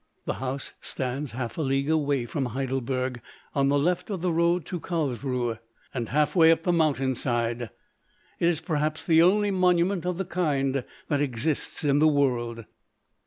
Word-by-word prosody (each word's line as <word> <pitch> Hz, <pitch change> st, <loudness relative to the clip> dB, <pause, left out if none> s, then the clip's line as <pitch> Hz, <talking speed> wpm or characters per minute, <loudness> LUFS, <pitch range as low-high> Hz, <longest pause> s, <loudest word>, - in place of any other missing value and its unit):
The -, -, -1 dB
house 135 Hz, +1 st, -4 dB
stands 130 Hz, +1 st, -4 dB
half 120 Hz, +3 st, -4 dB
a -, -, +1 dB
league 135 Hz, +1 st, 0 dB
away 145 Hz, -5 st, +1 dB
from 135 Hz, +3 st, -2 dB
Heidelberg, 130 Hz, 0 st, -2 dB, 0.3 s
on 140 Hz, -1 st, +2 dB
the 145 Hz, -, +3 dB
left 180 Hz, +6 st, 0 dB
of 190 Hz, -4 st, -4 dB
the 180 Hz, -, +2 dB
road 170 Hz, +1 st, +2 dB
to 180 Hz, -, -4 dB
Carlsruhe, 130 Hz, -8 st, -2 dB, 0.3 s
and 120 Hz, -3 st, -3 dB
half 150 Hz, +5 st, +1 dB
way 165 Hz, -2 st, +7 dB
up 165 Hz, 0 st, +1 dB
the 175 Hz, -, +2 dB
mountain 145 Hz, -5 st, +2 dB
side. 120 Hz, -1 st, -1 dB, 0.7 s
It 170 Hz, -, +3 dB
is 170 Hz, -2 st, +1 dB
perhaps 155 Hz, -1 st, -1 dB
the 165 Hz, -1 st, +5 dB
only 205 Hz, +4 st, +4 dB
monument 180 Hz, -1 st, +2 dB
of 180 Hz, -1 st, -1 dB
the 190 Hz, -, -2 dB
kind 140 Hz, -7 st, 0 dB, 0.2 s
that 145 Hz, -2 st, +1 dB
exists 140 Hz, +4 st, -2 dB
in 145 Hz, -1 st, +3 dB
the 155 Hz, -, +5 dB
world. 120 Hz, -6 st, +1 dB
145 Hz, 170 wpm, -26 LUFS, 130-170 Hz, 0.7 s, way